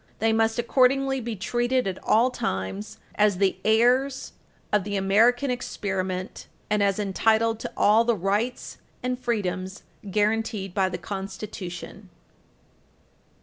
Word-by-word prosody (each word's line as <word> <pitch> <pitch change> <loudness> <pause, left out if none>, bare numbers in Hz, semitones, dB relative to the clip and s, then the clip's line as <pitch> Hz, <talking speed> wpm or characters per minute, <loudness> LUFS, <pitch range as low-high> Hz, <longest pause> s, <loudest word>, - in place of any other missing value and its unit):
They 225 +1 +2
must, 225 +1 +2
accordingly, 265 +2 +2
be 230 -1 -4
treated 240 +6 0
at 190 -1 -5
all 240 +4 +3
times 95 - -4 0.2
as 205 -2 +2
the 195 0 +1
heirs 250 +5 +2 0.4
of 210 -2 +3
the 205 +1 -4
American 230 +7 +3
experiment, 190 -6 -4 0.2
and 210 -1 +2
as 200 -1 +2
entitled 220 +2 +1
to - - -5
all 215 +3 +5
the 235 0 +2
rights 205 +7 -2 0.2
and 250 0 -2
freedoms 190 -6 -3 0.3
guaranteed 210 -1 0
by 190 -1 +1
the 180 - -4
Constitution. 195 0 -7
215 Hz, 125 wpm, -25 LUFS, 195-240 Hz, 0.4 s, all